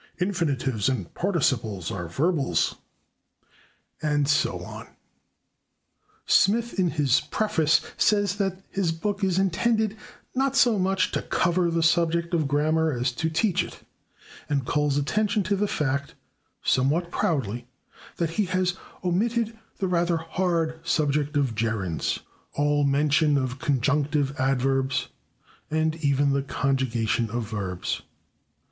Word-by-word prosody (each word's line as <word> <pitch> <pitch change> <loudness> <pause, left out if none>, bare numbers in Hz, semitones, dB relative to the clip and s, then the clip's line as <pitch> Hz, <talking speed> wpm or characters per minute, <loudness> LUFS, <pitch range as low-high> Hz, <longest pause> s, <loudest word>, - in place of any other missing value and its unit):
Infinitives 140 - 0
and 110 -10 -3
Participles 120 - 0
are 90 -3 -4
Verbals. 145 - +1 1.3
And 145 -2 +1
so 140 - +1
on. - - -9 1.4
Smith, 230 +2 +3
in 180 -2 +3
his 145 -5 +2
preface, 160 -8 +2 0.2
says 205 -2 +2
that 195 -1 -2
his 190 -4 0
book 200 +5 -3
is 185 -2 +2
intended, 215 +3 +1 0.4
"not 270 +1 0
so 240 -6 +4
much 190 0 +1
to - - -1
'cover' 175 0 +1
the 165 0 0
subject 170 +1 +2
of 160 -4 +2
grammar 155 +3 +2
as 125 -1 0
to 160 +6 -2
/teach/ 180 +2 +1
it," - - -11 0.7
and 140 -3 0
calls 145 0 +1
attention 210 +8 +1
to 200 +3 0
the 205 +2 0
fact, 140 -5 -2 0.5
somewhat 155 +7 +1
proudly, 125 - -1 0.5
that 165 -2 -1
he - - +1
has 185 0 0 0.3
omitted 225 +5 0 0.2
"the 190 - -1
rather 175 -1 +1
hard 165 -1 -1
subject 150 -2 0
of 135 -5 +1
gerunds," 105 -6 -1 0.3
all 145 0 +2
mention 145 +1 +3
of 130 -1 -2
conjunctive 140 +1 +1
adverbs, 135 0 +1 0.6
and 155 0 +1
even 140 -2 +2
the 140 - +1
conjugation 125 -5 0
of 115 -1 -3
verbs. 95 -5 -3
155 Hz, 125 wpm, -25 LUFS, 135-180 Hz, 1.4 s, so